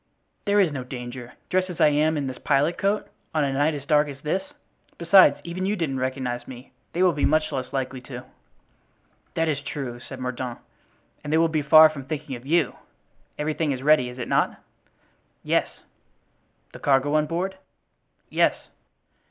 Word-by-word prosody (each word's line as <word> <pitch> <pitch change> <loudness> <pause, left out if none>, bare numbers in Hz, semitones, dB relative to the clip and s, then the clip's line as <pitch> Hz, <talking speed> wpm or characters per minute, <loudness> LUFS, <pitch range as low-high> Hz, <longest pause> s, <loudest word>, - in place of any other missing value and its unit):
"There 205 0 +3
is 185 -6 +4
no 135 -3 -4
danger, 125 -1 -8 0.2
dressed 185 0 +1
as 175 -2 -7
I 155 -2 +6
am 155 +2 +2
in 145 - -2
this 130 -1 -5
pilot 145 +4 +2
coat, 200 +1 0 0.3
on 155 - +3
a 140 -1 0
night 145 +3 +1
as 140 -1 -7
dark 150 0 +3
as 140 -1 -8
this. 155 +6 -1 0.6
Besides 170 -3 +6
even 180 +2 -3
you 205 - +1
didn't 150 -8 -2
recognize 130 -2 -3
me; 130 0 -11 0.2
they 180 - +1
will 180 -2 +4
be 145 - -3
much 155 0 +2
less 130 -1 -4
likely 130 -1 -3
to." 125 -1 -7 1.1
"That 165 0 +1
is 145 -3 -1
true," 130 -4 -5
said 130 +1 -10
Mordaunt, 125 -1 -4 0.7
"and 145 - -5
they 160 - +4
will 165 0 +3
be 155 -1 0
far 155 +2 +8
from 140 -4 -8
thinking 150 -2 -5
of 120 +2 -11
you. 160 -2 +1 0.6
Everything 155 0 -1
is 130 -1 -4
ready, 150 -4 +4
is 125 - -10
it 125 - -4
not?" - - +1 0.8
"Yes." - - +2 1.1
"The - - -10
cargo 140 +1 +2
on 155 0 +2
board?" 185 +4 -3 0.7
"Yes." - - +2
145 Hz, 180 wpm, -24 LUFS, 130-160 Hz, 1.1 s, far